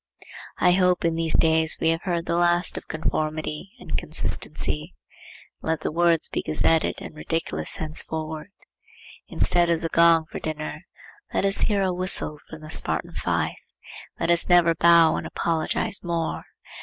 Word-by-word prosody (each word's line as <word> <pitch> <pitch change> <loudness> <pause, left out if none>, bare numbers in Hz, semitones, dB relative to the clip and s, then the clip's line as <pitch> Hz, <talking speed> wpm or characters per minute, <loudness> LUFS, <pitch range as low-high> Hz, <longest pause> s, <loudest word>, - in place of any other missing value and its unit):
I 180 - +3
hope 180 -1 +2
in 165 - +1
these 165 -1 0
days 160 0 +2
we 160 - +1
have 165 +1 0
heard 175 -3 -2
the 170 - -1
last 175 0 +2
of - - -7
conformity 155 +2 -3
and - - -6
consistency. - - -1 0.7
Let 160 -1 -2
the - - -3
words 170 0 +2
be - - -3
gazetted 160 +1 +1
and - - -9
ridiculous 155 - -1
henceforward. 155 +1 -5 0.8
Instead 175 -1 +2
of 170 -1 +1
the 165 - -2
gong 165 -1 +4
for - - -8
dinner, 155 -1 -6 0.5
let - - +1
us 195 0 +4
hear 200 -3 +1
a 185 -1 0
whistle 180 -4 +1
from 155 - -10
the 155 0 -10
Spartan - - -1
fife. - - -2 0.6
Let 170 - 0
us 170 +1 +5
never 175 -2 +5
bow 170 -1 +5
and - - -5
apologize 165 +3 -2
more. 170 -2 -3
165 Hz, 155 wpm, -24 LUFS, 160-175 Hz, 0.8 s, us